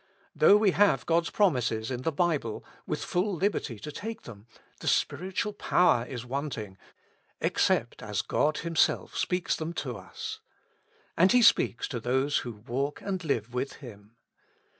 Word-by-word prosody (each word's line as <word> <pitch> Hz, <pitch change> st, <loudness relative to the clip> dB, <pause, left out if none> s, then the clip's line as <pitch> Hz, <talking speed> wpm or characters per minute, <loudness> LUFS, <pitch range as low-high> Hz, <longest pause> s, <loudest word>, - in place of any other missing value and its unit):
Though 205 Hz, -, +7 dB
we 210 Hz, -2 st, +3 dB
have 190 Hz, -, +3 dB
God's 170 Hz, 0 st, +2 dB
promises 125 Hz, -, +1 dB
in 125 Hz, -1 st, -3 dB
the 165 Hz, -, 0 dB
Bible, 150 Hz, -8 st, -1 dB, 0.2 s
with -, -, -2 dB
full 185 Hz, +2 st, 0 dB
liberty 180 Hz, -, -1 dB
to 150 Hz, +9 st, -7 dB
take 220 Hz, +9 st, -6 dB
them, 105 Hz, -1 st, -12 dB, 0.3 s
the -, -, -7 dB
spiritual 185 Hz, +7 st, 0 dB
power 180 Hz, -, +3 dB
is 125 Hz, -1 st, -6 dB
wanting, 120 Hz, -8 st, -5 dB, 0.6 s
except -, -, +1 dB
as -, -, -2 dB
God 155 Hz, +1 st, +1 dB
Himself 165 Hz, -1 st, +1 dB
speaks 180 Hz, -1 st, 0 dB
them 160 Hz, +1 st, -4 dB
to 125 Hz, -8 st, -4 dB
us. 95 Hz, -, -7 dB, 0.8 s
And 185 Hz, +3 st, +5 dB
He 250 Hz, -1 st, +5 dB
speaks 130 Hz, -, +4 dB
to 120 Hz, -, -3 dB
those 130 Hz, +5 st, +1 dB
who 120 Hz, -, -5 dB
walk 140 Hz, +5 st, -2 dB
and 190 Hz, -2 st, -3 dB
live 120 Hz, -7 st, -1 dB
ivith 125 Hz, +3 st, -3 dB
Him. 110 Hz, -5 st, -13 dB
145 Hz, 155 wpm, -28 LUFS, 120-180 Hz, 0.8 s, Though